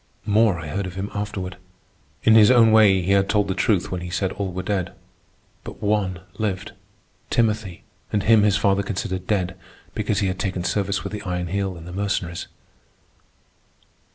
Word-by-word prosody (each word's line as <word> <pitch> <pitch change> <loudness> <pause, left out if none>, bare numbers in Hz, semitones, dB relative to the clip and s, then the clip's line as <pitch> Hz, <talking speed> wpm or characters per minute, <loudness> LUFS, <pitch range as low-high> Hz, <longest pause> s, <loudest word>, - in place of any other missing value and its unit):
More 105 -3 +3
I 80 - -7
heard 100 +5 -3
of 90 - -9
him 95 +2 -4
afterward. 95 -3 -4 0.7
In 110 - +5
his 110 0 +7
own 115 -3 +6
way 100 -4 +5
he 95 - 0
had 100 0 +3
told 105 -1 +2
the 95 - 0
truth 95 -1 +1
when 90 -1 -3
he 90 - -6
said 95 +1 -1
all 100 -2 -4
were 90 +1 -4
dead. 95 -2 -2 0.7
But - - -9
one 100 -3 0 0.2
lived, 100 -1 -2 0.6
Timothy, 110 -6 0 0.3
and 105 -2 0
him 110 -1 +5
his 105 -1 +3
father 100 -1 +2
considered 95 -2 -4
dead 95 -3 0 0.4
because 105 -1 -1
he 100 - +1
had 95 0 -3
taken 95 -2 -2
service 100 0 -1
with - - -6
the 105 - -4
Iron 90 -3 -3
Heel 95 -1 -2
in 85 - -11
the 90 - -9
Mercenaries. 95 -3 -2
100 Hz, 180 wpm, -23 LUFS, 90-105 Hz, 0.7 s, his